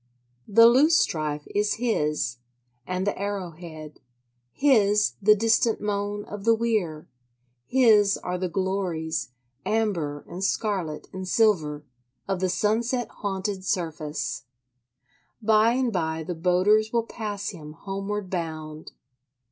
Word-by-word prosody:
The 230 +3 +7
loosestrife 230 - +3
is 210 0 +1
his, 150 - -1 0.5
and 185 +1 -2
the 205 - 0
arrow 200 -3 -3
head: 155 -2 -10 0.5
his 210 -7 +3
the 210 +2 +6
distant 225 +1 +2
moan 205 0 -2
of 205 -1 -8
the 230 +1 +4
weir; 210 -10 -1 0.6
his 215 -6 +4
are 180 0 -4
the 185 -1 -2
glories, 170 -5 -2 0.3
amber 175 -10 -1
and 180 +2 -6
scarlet 190 -7 -1
and 190 0 -6
silver, 160 -9 +2 0.4
of 195 -2 -1
the 185 0 0
sunset 230 +5 0
haunted 195 -1 -3
surface. 160 -7 -3 0.9
By 220 +1 +4
and 250 -2 0
by 160 -3 -1
the 175 - -4
boaters 185 +6 +2
will 235 -1 +1
pass 210 -3 -4
him 150 -6 -9
homeward 195 +2 -5
bound. 155 -3 -5
195 Hz, 120 wpm, -25 LUFS, 165-215 Hz, 0.9 s, The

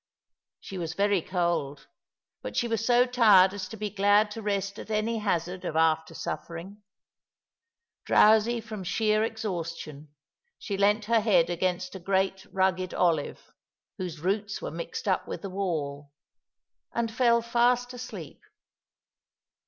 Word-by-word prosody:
She 190 - -8
was 160 -2 -4
very 200 -2 +2
cold, 170 -6 -2 0.6
but - - -6
she 240 - +1
was 225 -2 -1
so 245 +1 +4
tired 210 -7 +5
as 195 -2 -5
to 225 - -8
be 210 -1 -4
glad 205 +1 +3
to 225 - -6
rest 200 -1 -2
at - - -9
any 220 +1 0
hazard 180 -3 -2
of - - -4
after 160 0 +2
suffering. 180 +5 -6 1.2
Drowsy 220 +2 +4
from 215 -3 -7
sheer 215 +3 +1
exhaustion, 170 -9 -5 0.5
she 205 - -4
leant 205 +2 +2
her 230 0 +3
head 180 -6 +3
against 185 +1 -1
a 190 - -7
great 190 +1 -1
rugged 185 -1 0
olive,' 165 -5 0 0.5
whose 170 -4 -5
roots 200 +3 -1
were - - -5
mixed 170 +5 -6
up 185 - +1
with - - -6
the 195 - -5
wall, 150 -7 -3 0.8
and 235 -1 -1
fell 235 -1 +3
fast 245 +1 +2
asleep. 215 - -8
195 Hz, 140 wpm, -27 LUFS, 175-220 Hz, 1.2 s, tired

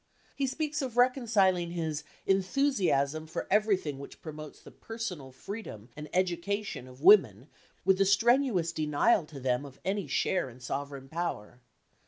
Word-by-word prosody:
He 275 -1 0
speaks 295 +2 -2
of 255 -3 -5
reconciling 215 -9 +3
his 160 -3 -3 0.2
"enthusiasm 185 - +1
for 160 - -4
everything 195 -9 +1
which 140 - -10
promotes 155 -1 -9
the - - -14
personal 190 - -6
freedom 130 - -8
and 150 0 -8
education 185 -3 -1
of 130 +3 -14
women 150 - +6 0.4
with 190 0 +4
the 195 - +4
strenuous 210 -3 +3
denial 155 +4 +2
to 145 -2 -10
them 125 0 0
of 140 -1 -12
any 195 -3 -1
share 160 +2 0
in 125 +1 -14
sovereign 135 +2 -5
power." 135 -8 -4
175 Hz, 145 wpm, -30 LUFS, 140-210 Hz, 0.4 s, women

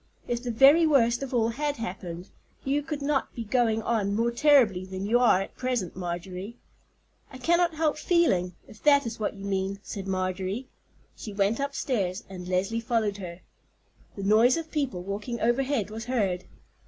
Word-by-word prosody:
If 240 0 -2
the 245 - -4
very 275 +8 +6
worst 240 -5 +3
of 275 - -5
all 230 -3 +2
had 290 +5 -2
happened, 180 -5 -6 0.3
you 280 +2 +1
could 295 -1 -5
not 280 -1 -1
be 235 - -4
going 225 0 +1
on 205 -4 0
more 230 +2 +1
terribly 240 -8 +4
than 190 +1 -5
you 235 +4 +3
are 210 -6 +4
at - - -13
present, 250 -8 -2
Marjorie." 185 +4 -5 0.7
"I 260 - -9
cannot 340 +4 +2
help 305 -1 0
feeling, 185 - +2
if 215 - -15
that 285 -2 +5
is 230 0 -5
what 210 0 -2
you 200 0 -9
mean," 195 0 -1
said 195 -2 -6
Marjorie. 190 +5 -2 0.5
She 210 - -8
went 200 +4 +1
upstairs, 245 -9 -2
and 180 -2 -8
Leslie 190 +5 0
followed 225 -4 0
her. 180 -2 -8 0.7
The 200 - -6
noise 220 +7 +5
of 325 -1 -6
people 260 - -2
walking 210 +5 -4
overhead 240 -2 0
was 225 +1 -6
heard. 200 -8 -1
225 Hz, 175 wpm, -27 LUFS, 195-265 Hz, 0.7 s, very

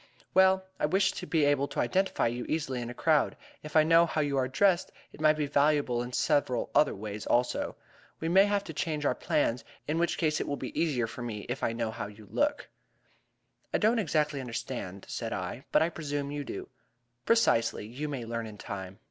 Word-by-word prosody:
"Well, 190 0 +5
I - - +2
wish 190 +3 +3
to 180 - -7
be 155 -3 +2
able 145 -1 +2
to - - -5
identify 190 +1 +1
you 120 +1 -1
easily 135 -6 -1
in 120 - -5
a - - -5
crowd. 155 0 +2 0.2
If 150 0 -10
I 155 - +7
know 165 +2 +5
how 160 - -2
you 145 -1 0
are 130 -1 +2
dressed, 180 +6 +2 0.2
it - - -11
might 155 0 +5
be 150 - 0
valuable 145 -3 +2
in 120 +1 -5
several 130 -2 +1
other 150 - +4
ways 105 +1 -6
also. 120 +1 +1 0.4
We 165 - -2
may 190 +4 +6
have 205 -1 +1
to 160 - -8
change 150 -1 -2
our - - +3
plans, 120 -5 0 0.2
in 155 +3 0
which 170 - +1
event 155 -2 +1
it - - -3
will 145 - -2
be 130 - -3
easier 140 -8 +1
for 115 - -8
me 110 -4 -5
if - - -3
I 115 - 0
know 115 -1 -2
how 105 -2 -5
you 105 0 -13
look." 290 0 0 1.1
"I - - +5
do 215 - +4
not 235 - +1
exactly 150 -6 0
understand," 115 -6 -5
said - - -4
I, - - -5
"but - - +5
I 165 - +1
presume 145 -3 -4
you 145 -1 -4
do." - - -6 0.6
"Precisely. 115 - +3
You 135 +7 -5
may 130 -5 -4
learn 115 0 -3
in 105 -1 -10
time." 95 -2 -7
145 Hz, 215 wpm, -29 LUFS, 120-165 Hz, 1.1 s, I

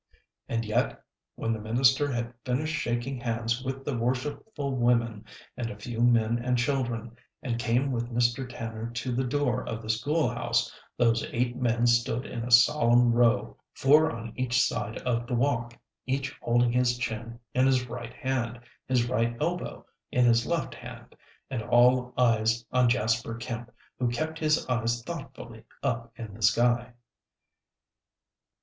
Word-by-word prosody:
And 115 0 -1
yet, 110 +4 -1 0.3
when 115 - -1
the 110 - -4
minister 130 +6 +3
had 120 -1 -3
finished 150 +5 -1
shaking 120 0 -2
hands 115 +1 -2
with 135 0 -4
the 145 - -1
worshipful 135 - -2
women 120 -3 +1 0.3
and 120 -2 -3
a 105 - -8
few 115 +2 -5
men 120 -1 +3
and 125 0 +1
children, 120 -3 -1 0.3
and 120 -4 -2
came 120 +4 +1
with 120 -1 -2
Mr. 120 +2 0
Tanner 115 -1 -5
to 125 +2 -2
the 125 +2 0
door 130 -1 0
of 115 -1 -5
the 110 - 0
school 145 +7 +1
house, 120 -1 0 0.2
those 115 -2 +3
eight 120 0 0
men 120 -1 +1
stood 120 +1 +2
in 115 - -5
a 120 - -4
solemn 120 0 +5
row, 120 +1 +2 0.2
four 150 +4 +5
on 115 -1 -7
each 125 -1 +1
side 115 -3 0
of 120 -1 -1
the 125 - -1
walk, 120 -2 0 0.3
each 135 0 -2
holding 120 0 +2
his 125 0 +2
chin 115 -1 -4 0.2
in 130 +1 +3
his 130 -2 +2
right 120 -1 -7
hand, 125 -2 -2 0.3
his 125 -2 +2
right 120 -1 0
elbow 170 +3 -3 0.3
in 125 -1 +3
his 115 -1 +3
left 170 -6 -1
hand, - - -11 0.4
and 125 -4 -2
all 125 +2 +4
eyes 115 -1 +2
on 125 -1 +4
Jasper 115 -1 0
Kemp, 115 0 -6 0.3
who 125 - +1
kept 155 +6 -3
his 155 0 +2
eyes 115 -1 0
thoughtfully 130 -7 -8 0.2
up 115 -1 -2
in 110 -4 -8
the 110 - -12
sky. 120 +2 +3
120 Hz, 160 wpm, -28 LUFS, 115-130 Hz, 0.4 s, solemn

